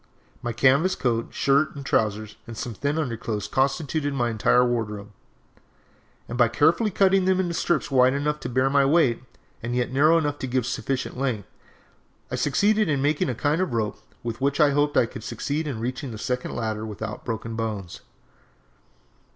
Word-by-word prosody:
My 120 - -2
canvas 135 +10 +3
coat, 115 -2 0
shirt, 140 +3 +2
and 140 -1 -8
trousers 110 -3 0
and 115 -1 -8
some 120 - -4
thin 145 +8 -2
underclothes 115 -7 -3
constituted 140 +2 0
my 120 -3 0
entire 115 +3 +3
wardrobe, 105 -4 -3 1.2
and 120 +1 -5
by 120 - +6
carefully 160 - +3
cutting 195 -1 +3
them 190 0 +2
into 175 -2 0
strips 170 -2 0
wide 130 -1 +5
enough 150 +1 -1
to 125 - -5
bear 130 +2 +2
my 140 0 +3
weight, 135 -5 +3 0.4
and 120 +1 -3
yet 125 0 0
narrow 155 +5 +5
enough 145 -3 -1
to 130 - -3
give 125 -1 0
sufficient 130 0 -3
length, 125 -7 -2 0.8
I - - -1
succeeded 205 +6 +2
in 140 -2 +1
making 145 +1 +1
a 125 - -2
kind 150 +7 +1
of 185 - -1
a - - -2
rope 110 -2 -2 0.2
with 115 +1 -5
which 140 +2 +1
I 150 -2 +5
hoped 145 +1 +1
I - - +5
could 115 -1 -9
succeed 145 +7 -3
in 130 -6 -4
reaching 125 +3 -4
the 110 - -7
second 125 +3 -3
ladder 110 -2 -2
without 110 0 -6
broken 115 0 -4
bones! 105 -6 -4
130 Hz, 185 wpm, -25 LUFS, 115-145 Hz, 1.2 s, by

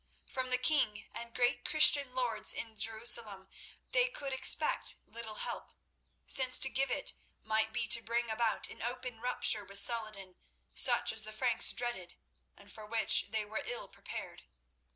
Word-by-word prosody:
From 260 -1 -3
the 255 - +2
king 250 -7 +1
and 235 0 -8
great 245 0 0
Christian 290 -4 +5
lords 235 -4 +1
in 225 -1 -7
Jerusalem 220 -2 -3 0.4
they - - +2
could 280 - -6
expect 265 - +3
little 225 -2 -10
help, - - -6 0.5
since 255 -1 +5
to 265 - +8
give 270 +1 -1
it - - 0 0.3
might 220 0 -1
be 225 +1 -3
to 230 - +5
bring 235 0 -3
about 225 0 -1
an - - -12
open 245 0 -6
rupture 225 -3 0
with 200 0 -9
Saladin, 215 -4 -2 0.4
such - - +4
as 220 0 +2
the 215 - -8
Franks 235 +1 +2
dreaded, 240 -8 -5 0.4
and 200 0 -15
for 215 -1 -11
which 225 0 +2
they 220 -1 -3
were 215 +1 -6
ill - - -7
prepared. - - -10
230 Hz, 160 wpm, -32 LUFS, 215-255 Hz, 0.5 s, to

